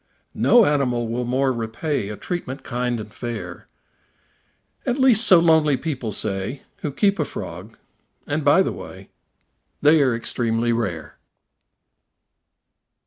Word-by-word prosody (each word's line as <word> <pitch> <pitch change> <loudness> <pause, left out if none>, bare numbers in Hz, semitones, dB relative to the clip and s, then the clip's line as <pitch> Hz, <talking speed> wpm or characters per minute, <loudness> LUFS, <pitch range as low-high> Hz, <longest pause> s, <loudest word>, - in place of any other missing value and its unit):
No 240 -3 +4
animal 125 -6 0
will 120 +2 -3
more 130 +2 0
repay 115 +1 -3
A 105 - -7
treatment 140 -7 -6
kind 125 -1 -3
and 105 -1 -10
fair; 105 -8 -7 1.2
At 250 - -2
least 245 -4 +8
so 185 - +8
lonely 160 -4 +3
people 130 -8 -4
say 100 +6 -4
Who 150 - -5
keep 200 +7 0
a - - +2
frog - - -9 0.5
(and, 145 +1 -3
by 145 +7 +4
the - - -3
way, - - -11 0.7
They 150 +1 +4
are 130 -4 +2
extremely 115 0 -1
rare). 85 -9 -4
130 Hz, 130 wpm, -21 LUFS, 115-155 Hz, 1.2 s, least